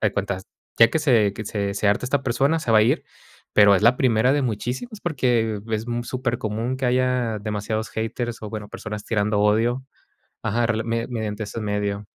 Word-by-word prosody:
de -, -, -10 dB
cuenta, 100 Hz, -1 st, -2 dB, 0.4 s
ya 115 Hz, -, +8 dB
que 160 Hz, -, +1 dB
se 115 Hz, -9 st, +3 dB
que 105 Hz, +1 st, -7 dB
se 100 Hz, -2 st, -2 dB
se 100 Hz, 0 st, 0 dB
harta 105 Hz, +5 st, +1 dB
esta 135 Hz, +2 st, 0 dB
persona, 135 Hz, +6 st, +1 dB
se 125 Hz, -, -3 dB
va 110 Hz, -, +6 dB
a -, -, +6 dB
ir, 110 Hz, -, +2 dB, 0.5 s
pero 100 Hz, -1 st, +7 dB
es -, -, +2 dB
la 120 Hz, +3 st, +5 dB
primera 125 Hz, 0 st, +3 dB
de 145 Hz, -, +2 dB
muchísimos, 130 Hz, -, -3 dB
porque 120 Hz, -9 st, +1 dB
es 110 Hz, +1 st, -1 dB
mu 120 Hz, 0 st, -2 dB
supercomún 120 Hz, -1 st, -2 dB
que 130 Hz, -, -3 dB
haya 125 Hz, -3 st, +1 dB
demasiados 105 Hz, +1 st, -3 dB
haters 115 Hz, +1 st, -3 dB
o, 105 Hz, -, -5 dB
bueno, 105 Hz, -2 st, -6 dB
personas 105 Hz, -1 st, -7 dB
tirando 105 Hz, -1 st, +1 dB
odio. 115 Hz, +5 st, +2 dB, 0.6 s
Ajá, 120 Hz, +3 st, +1 dB
rela 110 Hz, -1 st, 0 dB
media 115 Hz, 0 st, -1 dB
mediante 110 Hz, -3 st, -3 dB
este 105 Hz, +2 st, -6 dB
medio. 105 Hz, 0 st, -2 dB
115 Hz, 195 wpm, -23 LUFS, 105-125 Hz, 0.6 s, ya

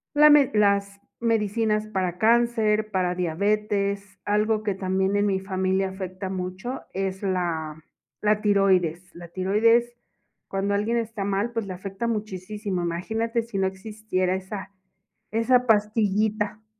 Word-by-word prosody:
la 300 Hz, +1 st, +8 dB
med 290 Hz, -3 st, +6 dB
las 200 Hz, -1 st, +2 dB, 0.2 s
medicinas 215 Hz, -1 st, +1 dB
para 185 Hz, -4 st, -2 dB
cáncer, 220 Hz, -1 st, +2 dB
para 185 Hz, -3 st, 0 dB
diabetes, 200 Hz, +2 st, -1 dB
algo 210 Hz, +1 st, +1 dB
que 205 Hz, -2 st, 0 dB
también 190 Hz, +1 st, 0 dB
en 205 Hz, -, +2 dB
mi 190 Hz, -2 st, 0 dB
familia 190 Hz, 0 st, 0 dB
afecta 190 Hz, 0 st, -6 dB
mucho 185 Hz, +7 st, -5 dB
es 190 Hz, 0 st, -3 dB
la 165 Hz, -5 st, -2 dB, 0.4 s
la 210 Hz, 0 st, +2 dB
tiroides 185 Hz, -4 st, +2 dB
la 170 Hz, 0 st, -10 dB
tiroides, 225 Hz, +7 st, +2 dB, 0.5 s
cuando 195 Hz, +1 st, -1 dB
alguien 210 Hz, +3 st, 0 dB
está 225 Hz, -3 st, -3 dB
mal, 200 Hz, +4 st, 0 dB
pues, 230 Hz, -4 st, -3 dB
le 185 Hz, -, -4 dB
afecta 195 Hz, +5 st, -5 dB
muchisísimo, 210 Hz, -3 st, -3 dB
imagínate 225 Hz, +7 st, -1 dB
si 230 Hz, -4 st, -6 dB
no 190 Hz, -1 st, +2 dB
existiera 190 Hz, -2 st, -2 dB
esa 190 Hz, +1 st, -6 dB, 0.6 s
esa 245 Hz, +3 st, +3 dB
pastillita. 210 Hz, 0 st, +1 dB
200 Hz, 130 wpm, -25 LUFS, 190-215 Hz, 0.6 s, la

